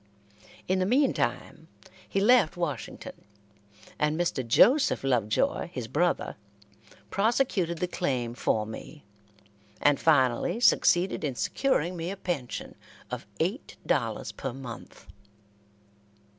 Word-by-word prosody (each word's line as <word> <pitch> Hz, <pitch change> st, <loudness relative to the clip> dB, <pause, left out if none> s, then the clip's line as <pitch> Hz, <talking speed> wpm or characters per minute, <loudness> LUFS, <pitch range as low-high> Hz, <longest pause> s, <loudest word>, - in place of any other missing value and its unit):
In 185 Hz, +1 st, +1 dB
the 185 Hz, -, +1 dB
meantime 265 Hz, +5 st, 0 dB, 0.4 s
he 195 Hz, -, 0 dB
left 210 Hz, -5 st, +4 dB
Washington, 150 Hz, -8 st, -5 dB, 0.8 s
and 150 Hz, +2 st, +1 dB
Mr. 170 Hz, -6 st, 0 dB
Joseph 240 Hz, -, +4 dB
Lovejoy, 130 Hz, -, +1 dB
his 125 Hz, -8 st, -5 dB
brother, 175 Hz, +8 st, 0 dB, 0.7 s
prosecuted 200 Hz, -5 st, +1 dB
the 180 Hz, -, -1 dB
claim 125 Hz, -10 st, -2 dB
for 110 Hz, -3 st, 0 dB
me, 115 Hz, +6 st, -10 dB, 0.7 s
and 145 Hz, -1 st, +3 dB
finally 145 Hz, -, +2 dB
succeeded 185 Hz, -6 st, +3 dB
in 140 Hz, -4 st, -2 dB
securing 180 Hz, -, 0 dB
me 170 Hz, 0 st, -4 dB
a 200 Hz, -, -5 dB
pension 160 Hz, -10 st, -4 dB, 0.4 s
of -, -, -5 dB
eight -, -, -2 dB
dollars -, -, -1 dB
per 135 Hz, -, -5 dB
month. 125 Hz, -3 st, -10 dB
170 Hz, 110 wpm, -28 LUFS, 130-195 Hz, 0.8 s, left